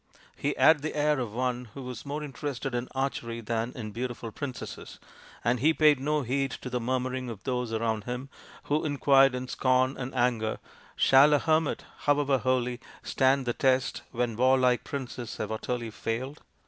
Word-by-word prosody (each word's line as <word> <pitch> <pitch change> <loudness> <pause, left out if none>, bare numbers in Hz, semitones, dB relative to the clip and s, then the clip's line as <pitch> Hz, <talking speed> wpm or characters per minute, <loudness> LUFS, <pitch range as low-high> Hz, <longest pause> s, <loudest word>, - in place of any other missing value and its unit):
He 145 +1 -1
had 160 -2 +6
the 155 - -4
air 150 -1 +2
of 120 -4 -3
one 125 +1 -2
who 135 - -6
was 125 +1 -7
more 150 +2 -3
interested 135 -2 -4
in 120 +1 -2
archery 120 -3 -2
than 115 +1 -2
in 110 -4 -6
beautiful 120 0 -5
princesses, 130 +1 -7 0.5
and 120 +1 +2
he 155 +5 +3
paid 150 -3 +5
no 150 +2 0
heed 135 +3 0
to 125 - -6
the 125 - 0
murmuring 130 +1 -2
of 110 -5 -8
those 125 -2 -2
around 110 -2 -1
him, 125 +2 -4 0.4
who 150 +2 0
inquired 135 -2 +4
in 125 0 -4
scorn 130 +1 +2
and 130 0 -5
anger, 120 -3 +1 0.2
" - - -25
Shall 140 +3 +7
a - - +5
hermit, 155 +1 +1 0.2
however 145 -2 +3
holy, 125 0 0 0.2
stand 135 0 +2
the 120 - 0
test 130 0 +1
when 120 -2 -1
warlike 130 0 +3
princes 125 -4 -6
have 110 - -3
utterly 115 +1 -3
failed 125 +8 -4
130 Hz, 175 wpm, -28 LUFS, 120-140 Hz, 0.5 s, Shall